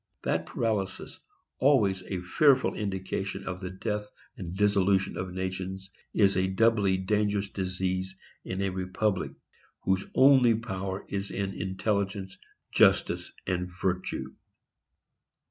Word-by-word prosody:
That - - 0
paralysis, 105 -5 -2 0.4
always 105 -9 +4
a 95 -2 -3
fearful 130 +8 +4
indication 95 -1 -3
of 90 0 -5
the 90 - -4
death 105 +2 -3 0.3
and 90 -2 -6
dissolution 100 -1 +3
of 90 0 -4
nations, 95 +1 -4 0.2
is 100 -2 +3
a 95 0 +2
doubly 100 -1 +3
dangerous 105 +1 0
disease 95 0 -2 0.3
in 95 +1 -3
a 100 - +1
republic, 95 +2 -1 0.5
whose 95 +1 0
only 130 -3 +6
power 95 -4 -4
is 100 0 -3
in 100 0 -3
intelligence, 95 0 -2 0.3
justice - - +3
and 90 -1 -1
virtue. 90 -8 -2
95 Hz, 115 wpm, -28 LUFS, 95-105 Hz, 0.5 s, only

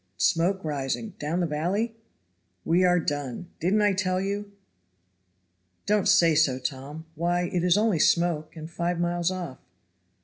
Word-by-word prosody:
Smoke 165 - +1
rising 145 - -3
down 160 +5 -1
the - - +1
valley?" 180 +9 -1 0.7
"We 175 +3 +3
are 180 -1 +4
done! 145 +2 -4
Didn't 200 +6 +2
I 205 -1 +3
tell 185 -1 0
you?" 200 +1 -3 1.3
"Don't 210 -1 +2
say 175 -6 +5
so, 150 -4 +3
Tom. 140 +4 -6
Why, 175 +2 0
it 175 -2 0
is 180 +1 +4
only 210 -6 +2
smoke, 170 -1 +1
and 160 -1 -7
five 170 +1 -2
miles 175 0 0
off." 180 -8 -5
175 Hz, 145 wpm, -26 LUFS, 155-185 Hz, 1.3 s, say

